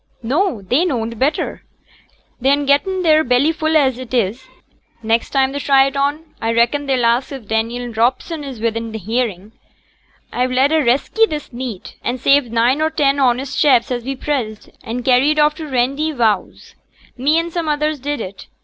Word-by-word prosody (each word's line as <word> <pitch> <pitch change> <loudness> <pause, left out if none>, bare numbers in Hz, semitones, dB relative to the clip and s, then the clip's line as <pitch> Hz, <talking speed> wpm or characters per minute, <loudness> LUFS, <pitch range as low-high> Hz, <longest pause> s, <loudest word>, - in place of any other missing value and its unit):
'No! 275 - 0
they 250 - +1
knowed 230 -9 -2
better. 285 +4 -1 0.8
They'n 280 +3 +2
getten 365 +7 +1
their 315 -2 +4
belly 255 +4 +2
full 315 -1 +1
as 265 -4 +1
it 255 -1 -5
is. 235 +3 -1 0.6
Next 225 +1 0
time 270 -1 +1
they 285 - -4
try 275 -1 +4
it 275 0 -3
on, 285 +3 -1 0.2
a 225 0 -1
reckon 260 +5 +1
they'll 255 -3 +1
ax 235 +4 +1
if 265 -6 -8
Daniel 230 +2 -2
Robson 260 +7 0
is 265 -5 -7
wi'in 230 0 -3
hearin'. 215 -2 -3 0.8
A've 250 +1 0
led 265 +3 +2
a 320 -1 +3
resky 275 - +2
this 300 -4 -6
neet, 240 -6 -7
and 250 +1 -2
saved 275 -2 +3
nine 240 +5 +2
or 315 - +2
ten 285 -3 +1
honest 265 +1 0
chaps 255 -4 +4
as 240 -1 -2
was 270 +2 -4
pressed, 245 -8 -3
and 240 +2 -5
carried 270 +4 +3
off 300 0 +4
to 310 +1 -8
t' 295 - -10
Randyvowse. 255 -4 -1 0.4
Me 285 +6 +2
and 335 0 -2
some 335 -3 -2
others 300 0 0
did 290 +2 -3
it. 190 -2 -8
265 Hz, 180 wpm, -18 LUFS, 235-295 Hz, 0.8 s, their